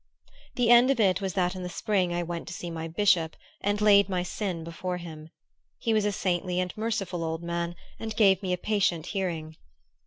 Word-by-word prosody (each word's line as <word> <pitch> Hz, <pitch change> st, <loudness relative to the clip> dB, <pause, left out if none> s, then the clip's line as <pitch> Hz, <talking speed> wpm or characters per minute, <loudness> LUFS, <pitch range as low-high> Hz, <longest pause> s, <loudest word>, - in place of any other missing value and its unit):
The 240 Hz, -2 st, +3 dB
end 240 Hz, +2 st, +7 dB
of 275 Hz, -3 st, +2 dB
it 190 Hz, -3 st, +3 dB
was 190 Hz, -2 st, -2 dB
that 180 Hz, -1 st, +1 dB
in 185 Hz, -, -6 dB
the 180 Hz, -, -4 dB
spring 190 Hz, -2 st, 0 dB
I 175 Hz, 0 st, -1 dB
went 170 Hz, -1 st, -5 dB
to 175 Hz, -, -6 dB
see 175 Hz, -, -6 dB
my 165 Hz, 0 st, -4 dB
bishop 170 Hz, -2 st, +2 dB, 0.3 s
and 205 Hz, +1 st, 0 dB
laid 200 Hz, -1 st, +5 dB
my 180 Hz, -2 st, 0 dB
sin 180 Hz, -3 st, -3 dB
before 180 Hz, +2 st, -4 dB
him. 160 Hz, -3 st, -9 dB, 0.5 s
He 230 Hz, -, 0 dB
was 215 Hz, -1 st, +2 dB
a 210 Hz, -, +2 dB
saintly 180 Hz, -2 st, -1 dB
and 180 Hz, -1 st, -2 dB
merciful 195 Hz, -6 st, -2 dB
old 160 Hz, +1 st, -3 dB
man, 170 Hz, 0 st, -2 dB, 0.2 s
and 220 Hz, -1 st, -5 dB
gave 195 Hz, -3 st, +4 dB
me 185 Hz, -2 st, -2 dB
a 180 Hz, -, +1 dB
patient 190 Hz, -5 st, 0 dB
hearing. 165 Hz, -5 st, -3 dB
180 Hz, 210 wpm, -27 LUFS, 170-205 Hz, 0.5 s, end